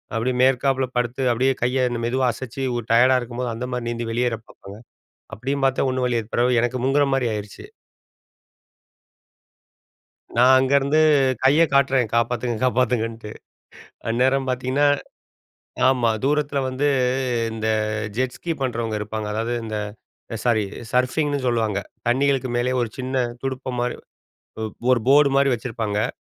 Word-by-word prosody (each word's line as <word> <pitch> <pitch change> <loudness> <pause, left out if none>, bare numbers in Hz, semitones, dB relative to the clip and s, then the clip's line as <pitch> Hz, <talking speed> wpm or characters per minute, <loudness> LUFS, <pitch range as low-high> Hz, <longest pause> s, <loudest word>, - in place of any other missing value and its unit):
அப்டியே 125 +3 0
மேற்காப்புல 130 +1 +2
படுத்து 120 +2 -1
அப்டியே 130 +3 +2
கைய 125 +1 +1 0.2
மெதுவா 130 +2 0
அசச்சி, 130 +3 -6
ஒரு 120 -2 -3
டயர்டா 125 +3 +5
இருக்கும்போது 120 0 -4
அந்த 120 +3 -4
மாரி 125 -1 -3
நீந்தி 120 0 -3
வெளியேற 120 0 0
பாப்பாங்க. 100 +1 -13 0.6
அப்டியும் 135 +4 -2
பாத்தேன், 135 0 +1
ஒண்ணு 130 0 -1
வழி 120 -1 +1
ஏற் 110 - -12
பிறவு 120 0 +3
எனக்கு 120 +1 -1
முங்குகிற 140 +2 +3
மாரி 130 -2 +1
ஆயிருச்சு. 105 -1 -7 2.7
நான் 125 +2 +6
அங்க 130 +1 0
இருந்து 140 +3 +1 0.4
கைய 145 +5 +5
காட்றேன் 135 -3 +3
காப்பாத்துங்க, 120 +1 0
காப்பாத்துங்கன்ட்டு. 115 -3 0 0.8
அந்நேரம் 130 +3 +1
பாத்தீங்கன்னா, 130 +3 +1 1.0
ஆமா, 125 -3 +2
தூரத்துல 145 -1 +1
வந்து 130 +3 -1 0.7
இந்த 110 0 -4 0.5
ஜெட் 130 0 -1
ஸ்கி 170 - -3
பண்றவங்க 115 -4 -2
இருப்பாங்க. 105 +1 -4
அதாவது 115 +3 -2
இந்த 110 -1 -4 0.7
சாரி 110 -4 +2 0.3
சர்ஃபிங்னு 140 +4 +1
சொல்லுவாங்க, 110 -4 0 0.3
தண்ணிகளுக்கு 135 0 +1
மேலே 125 +1 0
ஒரு 120 - 0
சின்ன 130 -1 -1 0.2
துடுப்பு 130 -1 -4
மாரி 125 0 -1 0.6
ஒரு 110 0 -3 0.2
போர் 130 -2 +4
போர்டு 140 0 +5
மாரி 140 0 +3
வச்சிருப்பாங்க. 110 -2 -2
125 Hz, 135 wpm, -22 LUFS, 115-135 Hz, 2.7 s, நான்